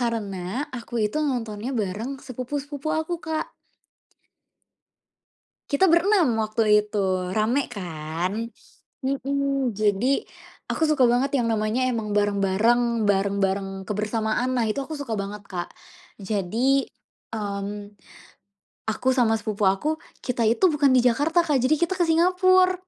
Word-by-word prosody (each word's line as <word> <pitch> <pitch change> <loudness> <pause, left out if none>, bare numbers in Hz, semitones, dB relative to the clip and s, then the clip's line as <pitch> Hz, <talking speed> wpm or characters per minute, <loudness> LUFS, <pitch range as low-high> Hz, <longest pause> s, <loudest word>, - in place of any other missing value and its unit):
Karena 210 -6 -2 0.3
aku 235 +1 -11
itu 210 - -5
nontonnya 240 -4 -2
bareng 210 +7 -3
sepupu-sepupu 280 +4 -5
aku, 330 +2 -3
Kak. 315 -1 -1 2.2
Kita 320 +7 +4
berenam 340 - +4
waktu 215 -1 +3
itu, 190 -3 -1
ramai 230 +7 +1
kan? 180 +4 -4 0.5
Mhm. 275 -3 -1
Jadi 215 - +1 0.4
aku - - -2
suka 290 -5 +4
banget 260 +4 +2
yang 240 - +1
namanya 220 +4 0
emang 220 -4 -1
bareng-bareng 210 +3 +2
bareng-bareng 195 -1 0
kebersamaan 220 +4 -1
lah. 230 - +2
Itu 220 +6 -1
aku 310 -2 -6
suka 265 -6 -4
banget, 200 0 -5
Kak. 175 -2 -5 0.5
Jadi, 220 +7 +1 0.5
mmm, 205 -1 -5 0.9
aku 220 +4 -2
sama 240 -4 +3
sepupu 215 -2 -1
aku, 300 +12 0 0.2
kita 240 -3 0
itu 325 - +4
bukan 285 -3 +3
di 250 - +4
Jakarta, 290 +8 +3
Kak. 295 -5 +1
Jadi 260 +5 +3
kita 345 +4 -1
ke 345 - +3
Singapura. 370 +2 +4
230 Hz, 125 wpm, -24 LUFS, 205-275 Hz, 2.2 s, Kita